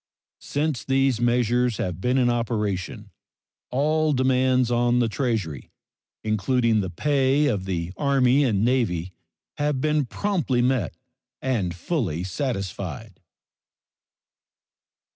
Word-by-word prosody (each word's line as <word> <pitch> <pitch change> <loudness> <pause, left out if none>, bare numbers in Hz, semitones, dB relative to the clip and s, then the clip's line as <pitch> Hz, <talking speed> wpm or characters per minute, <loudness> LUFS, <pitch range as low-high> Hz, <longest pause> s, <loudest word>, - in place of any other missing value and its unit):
Since 145 -4 -2
these 135 -3 +1
measures 120 -1 +2
have 90 -1 -3
been 125 +4 +1
in 125 -2 +3
operation 105 -6 -2 0.6
all 155 +3 +1
demands 130 -1 +2
on 120 0 +2
the 120 -1 +3
Treasury, 110 - -2 0.5
including 110 +1 +1
the 95 - -3
pay 140 - +2
of 105 -9 0
the 90 -2 -3
Army 140 -1 +3
and 110 -5 +1
Navy, 95 -9 0 0.5
have 145 -2 0
been 150 -1 +1
promptly 155 - 0
met 125 -11 0 0.4
and 105 -10 -1
fully 90 - -2
satisfied. 95 - -4
120 Hz, 105 wpm, -24 LUFS, 100-135 Hz, 0.6 s, in